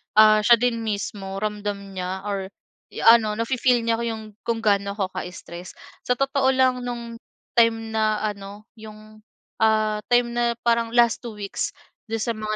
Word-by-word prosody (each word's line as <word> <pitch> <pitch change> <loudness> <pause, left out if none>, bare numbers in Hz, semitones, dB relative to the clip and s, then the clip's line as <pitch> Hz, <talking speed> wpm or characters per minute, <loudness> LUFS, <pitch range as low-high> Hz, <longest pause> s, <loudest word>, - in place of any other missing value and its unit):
ah, 215 0 +7
siya 235 +3 +6
din 235 0 0
mismo 200 -2 -4
ramdam 210 -1 -2 0.2
niya 190 0 -4
or 200 -2 -3 0.6
ano, 215 -2 +3
nafi-feel 240 +1 +1
niya 230 0 0
yung 220 -1 -6 0.2
kung 230 -1 -1
ga'no 200 -1 +1
ako 190 -3 -2
ka-stress. 175 0 -8 0.3
Sa 250 - +3
totoo 270 0 +1
lang, 255 -1 +3
no'ng 235 -1 -6 0.3
time 225 -1 +2
na 215 -1 0
ano, 205 0 -5 0.2
yung, 215 0 -13 0.4
ah, 215 -1 +2
time 245 -1 +3
na 235 0 0
parang 235 -1 +2
last 235 -2 +4
2 235 -3 -8
weeks 200 -1 -4 0.3
do'n 225 -1 -2
sa 235 - -1
mga 215 -1 -3
220 Hz, 160 wpm, -23 LUFS, 210-235 Hz, 0.6 s, ah